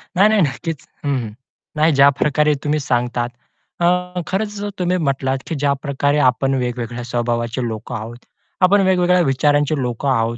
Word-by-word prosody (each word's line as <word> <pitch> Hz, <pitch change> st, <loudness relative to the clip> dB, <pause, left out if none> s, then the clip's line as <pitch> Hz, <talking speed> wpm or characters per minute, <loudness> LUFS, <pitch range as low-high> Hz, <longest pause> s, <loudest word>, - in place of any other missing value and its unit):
नाही, 195 Hz, +4 st, +6 dB
नाही. 215 Hz, -2 st, +3 dB
नक्कीच. 155 Hz, 0 st, -2 dB, 0.2 s
हं, 140 Hz, -1 st, +1 dB
हं. 115 Hz, -4 st, -4 dB, 0.5 s
नाही 155 Hz, +2 st, +3 dB
ज्या 140 Hz, 0 st, +6 dB
प्रकारे 150 Hz, +1 st, +2 dB
तुम्ही 150 Hz, +1 st, 0 dB
सांगतात. 120 Hz, -2 st, -1 dB, 0.5 s
अ, 180 Hz, +1 st, +1 dB
खरंच 205 Hz, +1 st, -2 dB, 0.2 s
तुम्ही 180 Hz, 0 st, +1 dB
म्हटलात, 135 Hz, -4 st, 0 dB
की 165 Hz, -, -3 dB
ज्या 140 Hz, 0 st, +2 dB
प्रकारे 145 Hz, +1 st, 0 dB
आपण 135 Hz, +2 st, -1 dB
वेगवेगळ्या 120 Hz, -1 st, -4 dB
स्वभावाचे 120 Hz, 0 st, -2 dB
लोकं 110 Hz, +2 st, -6 dB
आहोत, 115 Hz, +1 st, -6 dB, 0.4 s
आपण 195 Hz, +2 st, +5 dB
वेगवेगळ्या 180 Hz, -1 st, +3 dB
विचारांचे 145 Hz, +2 st, +2 dB
लोकं 125 Hz, +2 st, -2 dB
आहोत 115 Hz, -2 st, 0 dB
140 Hz, 155 wpm, -19 LUFS, 120-170 Hz, 0.5 s, नाही